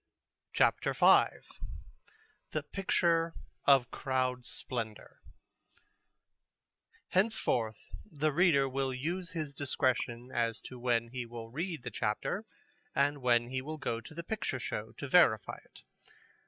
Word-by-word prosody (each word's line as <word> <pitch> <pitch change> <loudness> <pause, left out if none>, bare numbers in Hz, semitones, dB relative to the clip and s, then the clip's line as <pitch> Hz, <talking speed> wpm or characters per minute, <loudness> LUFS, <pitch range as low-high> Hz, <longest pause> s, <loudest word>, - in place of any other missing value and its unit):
CHAPTER - - +3
V - - +7 1.3
THE 155 - -1
PICTURE 170 -1 +1 0.3
OF 135 -3 +5
CROWD 130 -2 -1
SPLENDOR 115 -4 -5 1.9
Henceforth 185 - 0 0.2
the 155 0 0
reader 150 -4 +4
will 135 0 -1
use 175 +6 -3
his 155 -4 -3
discretion 130 -3 -1
as 115 -2 0
to 125 - -10
when 120 -1 +1
he 125 -1 -5
will 115 -1 -8
read 160 0 -3
the 125 - -5
chapter 110 - -2 0.5
and 145 +1 +2
when 120 -1 +3
he 130 0 -2
will 155 +4 -5
go 115 -6 -2
to 160 - -12
the 170 - -5
picture 190 -9 -3
show 110 -2 -4
to 140 - -6
verify 130 - +4
it. - - -18
130 Hz, 125 wpm, -32 LUFS, 120-155 Hz, 1.9 s, V